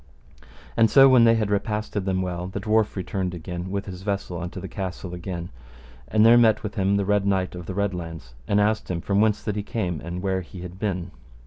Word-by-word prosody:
And 115 -1 +5
so 135 +4 +8
when 130 -3 +6
they 115 0 +6
had 110 -2 0
repasted 105 0 -1
them 95 -1 0
well, 90 -1 -4
the 95 +2 -5
dwarf 110 +1 +1
returned 95 -1 -3
again 90 +2 -6
with 100 +1 -3
his 95 -2 -8
vessel 100 -3 -3
unto 90 +2 -5
the 95 - -6
castle 95 -1 -5
again; 90 -1 -5 0.6
and 110 0 +4
there 120 +1 +8
met 110 -2 +4
with 105 -2 -4
him 100 +1 +1
the 100 - 0
Red 105 0 +1
Knight 95 -2 0
of 90 -2 -8
the 95 - -4
Red 100 0 +1
Launds, 80 -8 -7
and 100 - +3
asked 105 +1 +1
him 90 -2 -1
from 100 +4 +1
whence 110 -1 +2
that 105 -2 -2
he 105 - -1
came, 90 -6 -3
and 85 +2 -5
where 95 -1 0
he 90 +1 -10
had 90 +1 -9
been. 95 -4 -2
95 Hz, 230 wpm, -24 LUFS, 90-105 Hz, 0.6 s, so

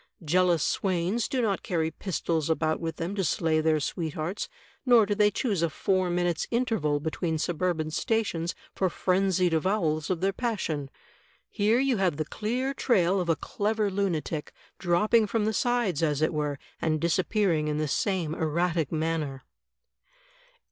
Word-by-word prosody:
Jealous 175 0 +3
swains 190 +4 0
do 255 -2 -1
not 200 -4 0
carry 160 -2 -1
pistols 165 -3 -2
about 160 -1 +1
with 165 -1 -3
them 170 +4 -3
to 200 -1 -1
slay 160 -2 +1
their 155 -1 +2
sweethearts, 160 +4 -3 0.3
nor 240 -5 +6
do 205 - 0
they 205 0 +4
choose 205 -4 -1
a 170 - +2
four 185 +3 0
minutes* 175 -1 0
interval 225 - 0
between 160 +2 -2
suburban 165 -1 -1
stations 175 -4 -1 0.2
for 190 - +1
frenzied 185 -1 +1
avowals 160 -3 0
of 180 -3 0
their 195 +2 +1
passion. 175 - -2 0.6
Here 215 +2 +2
you 265 -2 +2
have 180 -6 +1
the 155 - -1
clear 245 - -2
trail 190 -8 +2
of 175 - -3
a 165 - +4
clever 210 +4 -1
lunatic, 170 -6 -2 0.3
dropping 210 +5 +3
from 215 0 0
the 220 - 0
sides, 235 - +1
as 150 -2 +1
it 155 - +1
were, 150 -2 -1 0.2
and 155 -1 +1
disappearing 170 -1 +1
in 150 0 -1
the 155 0 0
same 175 -1 0
erratic 165 0 0
manner." 155 -4 -2
175 Hz, 155 wpm, -27 LUFS, 160-205 Hz, 0.6 s, nor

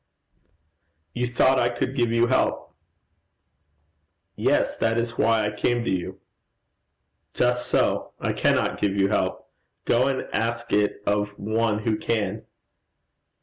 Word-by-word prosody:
'You 125 0 -1
thought 130 +2 +3
I 120 - +2
could 120 +2 -3
give 120 -3 +1
you 115 0 +3
help?' 130 +2 0 1.6
'Yes. - - +1
That 115 0 +1
is 115 0 -2
why 115 -2 +2
I 105 - -1
came 120 +3 0
to - - -1
you.' 90 -2 -3 1.2
'Just 125 0 +1
so. - - +1
I - - -1
cannot - - +1
give 100 -1 +1
you 100 -1 +2
help. - - -1 0.4
Go 125 +3 +3
and 135 -1 -2
ask 115 +1 -2
it 105 0 +1
of 105 0 -1
one 110 0 -1
who 110 -1 0
can.' 110 -1 -2
115 Hz, 135 wpm, -24 LUFS, 105-120 Hz, 1.6 s, thought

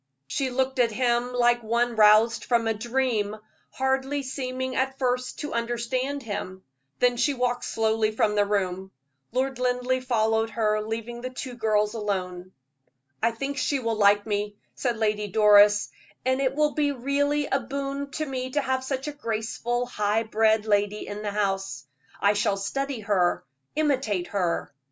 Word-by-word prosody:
She 260 - -1
looked 265 +1 -1
at 235 -2 +4
him 240 +1 +1
like 240 -1 +3
one 235 +1 0
roused 215 +2 +5
from 235 -2 +2
a 225 - +2
dream, 230 -2 -1 0.3
hardly 265 +2 -1
seeming 260 -1 -4
at 265 +1 0
first 250 -1 -1
to 295 - -4
understand 240 +4 -2
him; 190 -3 -5 0.3
then 245 -1 +2
she 285 +3 +2
walked 245 -1 -1
slowly 220 -1 +1
from 215 -1 +1
the 205 -1 +2
room. 190 -2 -1 0.4
Lord 260 +1 -1
Linleigh 250 +1 +1
followed 225 -3 +1
her, 215 -1 0
leaving 230 +2 -5
the 255 - -4
two 255 0 -6
girls 215 -2 +1
alone. 185 -4 -3 0.7
"I 230 - +4
think 275 +5 -4
she 280 +2 +1
will 230 -3 -1
like 205 -1 +4
me," 205 -1 -2 0.2
said 240 -3 -2
Lady 210 -1 0
Doris, 205 0 +5 0.3
"and 260 +1 +2
it 265 0 0
will 300 0 +2
be 290 -1 +1
really 285 +3 0
a 270 - 0
boon 275 +2 -4
to 310 - -2
me 260 -2 -4
to 290 - 0
have 260 -1 -1
such 265 +1 -3
a - - -2
graceful, 235 -1 -2
high 210 -2 0
bred 220 0 +2
lady 205 0 +1
in 205 +1 -6
the 210 - -2
house. 195 -8 -2 0.3
I 200 +1 +4
shall 205 -1 +1
study 270 +5 -3
her, 195 -4 +1 0.3
imitate 265 - +1
her. 180 -7 -1
235 Hz, 165 wpm, -26 LUFS, 210-260 Hz, 0.7 s, roused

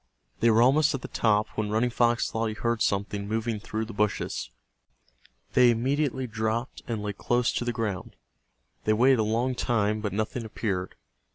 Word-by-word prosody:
They 115 - +4
were 115 +1 +5
almost 145 +4 +4
at 130 - -6
the - - -4
top 105 -1 +1
when 110 -1 -3
Running 115 +3 +1
Fox 120 0 +2
thought 115 0 -1
he 110 - -4
heard 115 0 -1
something 100 0 -1
moving 110 0 -1
through 110 +1 -3
the 115 - -9
bushes. 105 0 -1 1.0
They 125 -1 +6
immediately 130 +3 0
dropped 110 +1 -2
and 110 -4 -3
lay 105 -1 -2
close 120 +4 +1
to 120 - -2
the 120 - 0
ground. 110 -6 -4 0.7
They 110 - +3
waited 125 +3 +4
a - - +3
long 115 +4 0
time, 110 -3 0
but 105 -2 -2
nothing 110 +4 -2
appeared. 100 -4 -3
115 Hz, 180 wpm, -27 LUFS, 105-120 Hz, 1.0 s, They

